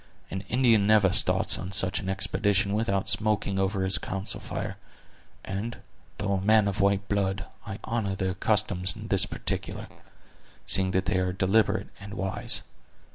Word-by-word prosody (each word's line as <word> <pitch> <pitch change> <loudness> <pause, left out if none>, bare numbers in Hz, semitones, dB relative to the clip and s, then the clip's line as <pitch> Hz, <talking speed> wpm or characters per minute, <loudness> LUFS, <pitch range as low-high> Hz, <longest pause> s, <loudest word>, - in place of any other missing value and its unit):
An 95 - -3
Indian 115 -4 +3
never 105 -3 +4
starts - - +3
on 95 +1 -6
such 95 -1 -1
an 95 - -5
expedition 100 +1 +1
without 100 -3 0
smoking 100 -1 +1
over 95 0 0
his 95 +1 +1
council 95 0 -3
fire; - - -5 0.7
and, 100 +5 -4 0.4
though 100 -1 -1
a 95 - 0
man 105 +1 +4
of 100 0 -1
white 100 0 +1
blood, 100 -1 -1 0.2
I 100 -2 -5
honor 110 -4 -2
their 95 -1 -2
customs 95 -3 0
in - - -9
this - - +3
particular, - - -4 0.8
seeing 95 -1 +6
that 95 0 0
they 90 +1 +1
are 90 0 0
deliberate 100 +3 +1
and 100 +1 -9
wise. 95 -2 +1
100 Hz, 160 wpm, -27 LUFS, 95-105 Hz, 0.8 s, seeing